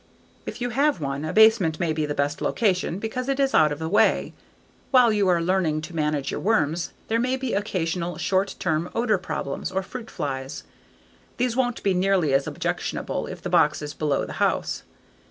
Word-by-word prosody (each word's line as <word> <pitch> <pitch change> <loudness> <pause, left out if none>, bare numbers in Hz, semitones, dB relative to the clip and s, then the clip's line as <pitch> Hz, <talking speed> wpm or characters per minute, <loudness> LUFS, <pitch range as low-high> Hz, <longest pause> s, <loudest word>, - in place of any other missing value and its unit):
If - - -6
you 245 0 -1
have 280 - +2
one, 140 -1 -3
a 155 - -2
basement 220 -7 +5
may 165 -2 0
be 155 -1 -1
the 145 - -3
best 145 +1 -1
location 185 -5 0
because 235 +5 -4
it 275 0 0
is 270 -1 +2
out 155 -1 +5
of 145 - -3
the 160 +1 -4
way. 210 +6 +2 0.6
While 250 -4 +5
you 205 -2 +2
are 175 -2 +3
learning 170 -3 +1
to 165 +2 -8
manage 150 -3 -1
your - - -3
worms 175 -6 +1 0.2
there 225 +1 +1
may 255 +2 0
be 260 -2 -3
occasional 175 -4 -2
short 195 +1 0
term 165 -2 -1
odor 225 -4 +2
problems 140 -3 -4
or 190 0 -1
fruit 230 +3 -8
flies; 135 -1 -4 0.7
these 245 -1 0
won't 245 -2 0
be 195 - +2
nearly 185 -5 +2
as 135 0 +2
objectionable - - -3
if - - -8
the - - -3
box - - +3
is 145 0 -5
below 150 -3 0
the - - -7
house. - - 0
185 Hz, 195 wpm, -24 LUFS, 155-225 Hz, 0.7 s, basement